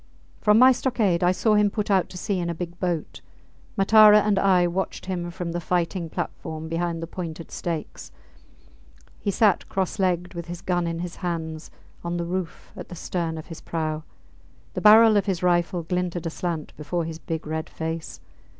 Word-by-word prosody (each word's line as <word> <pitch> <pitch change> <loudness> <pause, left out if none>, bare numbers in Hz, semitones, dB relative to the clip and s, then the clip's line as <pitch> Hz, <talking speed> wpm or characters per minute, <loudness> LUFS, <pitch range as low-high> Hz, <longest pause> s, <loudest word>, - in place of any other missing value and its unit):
From 210 0 +4
my 255 +2 +8
stockade 225 -9 +1
I 175 - +5
saw 215 +4 +2
him 210 -1 +4
put 210 0 -2
out 190 -2 +3
to 180 - -9
sea 190 +1 -1
in 170 -1 -2
a 170 - -3
big 175 +1 -6
boat. 175 -4 -3 0.6
Matara 210 +1 +7
and 205 -2 +2
I 185 -3 +4
watched 180 +2 -3
him 175 -2 -3
from 175 -1 -5
the 175 +1 -3
fighting 175 0 -1
platform 160 0 -5
behind 165 0 -2
the - - -2
pointed 165 -1 -7
stakes. 165 -3 -5 1.1
He - - -2
sat 200 0 +2
cross 190 +1 -2
legged, 180 -1 0
with 170 -1 -6
his 175 0 -7
gun 175 -2 0
in 165 0 -3
his 180 0 -6
hands, 160 -3 -4 0.3
on 170 0 -2
the 170 - -2
roof 180 0 -5
at - - -9
the 175 - -7
stern 165 -1 -3
of 155 - -7
his 165 -2 -10
prau. 155 -2 -3 0.7
The - - -3
barrel 215 0 +8
of 205 - +1
his 185 -3 -1
rifle 175 0 +1
glinted 180 0 -2
aslant 165 -1 -4
before 160 +3 -2
his 160 0 -6
big 160 0 -4
red 160 +1 -4
face. 160 0 -5
175 Hz, 185 wpm, -24 LUFS, 165-190 Hz, 1.1 s, my